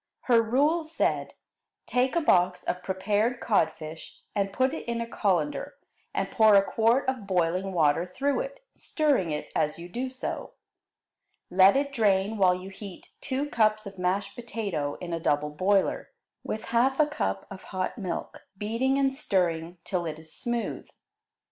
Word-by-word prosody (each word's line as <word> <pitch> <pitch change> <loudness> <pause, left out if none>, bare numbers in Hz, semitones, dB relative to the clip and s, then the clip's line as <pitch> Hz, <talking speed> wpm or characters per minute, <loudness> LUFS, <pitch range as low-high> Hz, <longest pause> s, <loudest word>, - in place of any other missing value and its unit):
Her 235 -3 +4
rule 285 +9 +2
said: 315 +1 -1 0.5
Take 255 +4 +1
a 340 - +3
box 180 - +3
of 180 - -2
prepared 205 +6 0
codfish 160 -6 -2
and 200 -1 0
put 260 +6 +1
it 320 - -6
in 235 0 -1
a 235 - -2
colander 180 -9 -1 0.4
and - - -2
pour 220 -2 +6
a 195 - +7
quart 230 +6 +2
of 255 -6 -2
boiling 185 +1 +1
water 165 0 +2
through 275 +10 0
it, - - -6
stirring 285 - +1
it 150 -1 -4
as 150 - +1
you 170 +1 -8
do 245 +8 -3
so. 255 0 -5 1.0
Let 190 +3 +6
it 280 0 0
drain 205 -2 +2
while 180 -2 +5
you 185 +1 -8
heat 195 -1 -10
two 275 +2 -2
cups 215 -1 +2
of 195 -1 -9
mashed 195 +2 -1
potato 200 -12 -3
in 175 -1 -6
a 165 - -1
double 150 -1 0
boiler, 190 +5 +1 0.3
with 215 - -4
half 265 +4 +3
a 305 - +6
cup 95 - -2
of 190 -1 -9
hot 185 +5 -3
milk, 180 -4 -5
beating 230 +7 0
and 270 -1 +2
stirring 175 - -1
till 175 -3 -2
it 155 -1 -4
is 160 0 -13
smooth. 240 -1 -3
200 Hz, 165 wpm, -27 LUFS, 180-250 Hz, 1.0 s, a